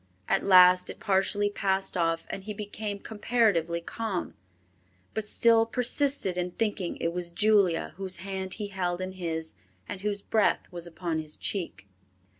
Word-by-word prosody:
At - - +1
last 180 -1 +7
it - - -8
partially 205 +1 +1
passed 195 -1 0
off 165 -1 0
and 195 - -6
he 210 -1 -5
became 210 0 -4
comparatively 205 -6 0
calm, 205 +1 -4 0.8
but 220 -1 -2
still 225 +1 +4
persisted 250 -5 0
in 180 0 -1
thinking 205 -2 -2
it 165 - -2
was 175 -1 -3
Julia 195 -2 +2
whose 190 -1 -1
hand 190 +1 -5
he 210 -2 -5
held 180 -2 -2
in 185 0 -4
his 165 -3 -4 0.3
and 185 - -6
whose 205 0 -1
breath 215 -2 +2
was 175 -1 -5
upon 170 -1 -3
his 155 -1 -4
cheek. 180 - -3
190 Hz, 155 wpm, -28 LUFS, 175-210 Hz, 0.8 s, last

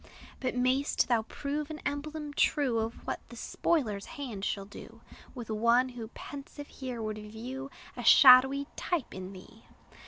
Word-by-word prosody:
But 255 -1 -2
may'st 255 +3 +1
thou 235 -2 +3
prove 290 +6 -4
an 310 - -5
emblem 295 +1 -4
true 275 -5 +2
Of 225 +1 -2
what - - -3
the - - -10
spoiler's 220 -12 -1
hand 240 -9 -5
shall 200 -1 -2
do 200 - -12 0.3
With 235 -3 -6
one, 235 +4 +3
who 240 -3 -7
pensive 285 +1 -8
here 255 -3 -6
would 215 0 -4
view 240 +6 -7 0.3
A 245 - -6
shadowy 265 +3 +8
type 340 -8 -2
in 185 0 -7
thee! 210 +4 -14
250 Hz, 155 wpm, -30 LUFS, 220-280 Hz, 0.3 s, shadowy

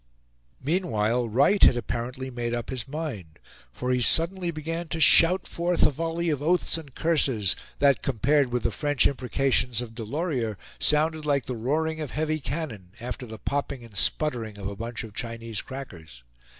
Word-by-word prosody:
Meanwhile 120 - +1
Wright 140 - +3
had 120 - +7
apparently 125 +2 -4
made 120 -1 -2
up 120 +1 -4
his 130 -2 -4
mind; 135 - -5 0.3
for 125 - -3
he 125 0 +2
suddenly 175 +6 +2
began 165 +1 -4
to 165 - -4
shout 165 +4 +6
forth 175 +1 +1
a - - +4
volley 165 +3 -1
of 145 -2 -2
oaths 170 +2 +2
and 150 -6 -8
curses, 130 - +2 0.2
that, 140 -2 +4
compared 135 +1 +2
with 120 -2 -1
the - - +1
French 145 -4 +1
imprecations 125 -2 +1
of 120 -2 -5
Delorier, 120 - -2 0.2
sounded 155 +1 +2
like 140 -3 +2
the 125 - -4
roaring 155 +7 -1
of 150 - -4
heavy 155 +2 -1
cannon 115 - -5
after 125 +1 -5
the 110 0 -8
popping 140 0 -3
and 110 -3 -16
sputtering 115 -2 0
of 100 -1 -5
a 100 - -5
bunch 115 +3 -5
of 110 -3 -9
Chinese 115 -1 -4
crackers. 85 - -9
130 Hz, 170 wpm, -26 LUFS, 115-155 Hz, 0.3 s, had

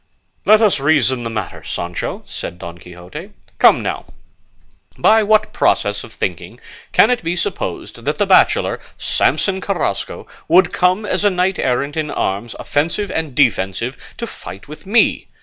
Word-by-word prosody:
"Let 215 +1 +6
us 205 -8 +3
reason 135 -4 +2
the 115 - -3
matter, 105 -5 -5
Sancho," 85 0 -4
said 85 - -7
Don 85 0 -9
Quixote. 90 - -10 0.3
"Come - - +6
now, - - -3 0.9
by 220 +1 +5
what 215 0 +2
process - - +1
of - - -12
thinking - - -5 0.3
can - - +5
it 245 0 0
be 170 +2 -1
supposed 415 - -4
that - - -1
the - - +2
bachelor - - +3 0.2
Samson 190 -1 +1
Carrasco 175 - -2 0.2
would 175 +2 +4
come 185 +4 +2
as 190 -1 -1
a 205 - +5
knight 185 0 0
errant, 140 +4 0
in 155 -1 -2
arms 100 +1 -2
offensive 170 +7 -1
and 160 -7 -3
defensive, 115 -1 +1 0.2
to - - -3
fight 100 +7 -10
with 150 +5 -12
me? 225 +3 +2
155 Hz, 155 wpm, -18 LUFS, -, 0.9 s, Let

